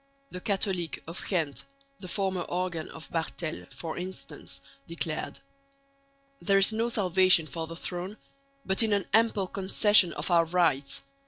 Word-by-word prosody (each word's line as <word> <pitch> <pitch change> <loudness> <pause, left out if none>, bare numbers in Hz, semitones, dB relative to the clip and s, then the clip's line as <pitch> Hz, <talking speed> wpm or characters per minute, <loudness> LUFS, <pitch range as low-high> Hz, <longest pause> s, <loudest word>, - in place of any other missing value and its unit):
The 180 - -7
Catholique 190 -4 0
of 165 +2 -7
Ghent 160 -7 -1 0.4
(the 185 - -8
former 190 -1 -1
organ 175 -3 -3
of 160 - -10
Barthels) 165 0 -4
for 165 0 -6
instance 185 +1 -8 0.3
declared: 165 -2 -4 1.0
There 195 -1 +3
is 195 +3 +6
no 230 +2 0
salvation 185 -5 +4
for 160 +3 -5
the 165 - -8
throne, 180 +4 -5 0.5
but 190 +3 +2
in 220 -2 +4
an 200 -2 +1
ample 220 -3 +3
concession 195 0 +4
of - - -3
our 170 -1 +5
rights. 165 -5 +1
180 Hz, 145 wpm, -28 LUFS, 165-195 Hz, 1.0 s, is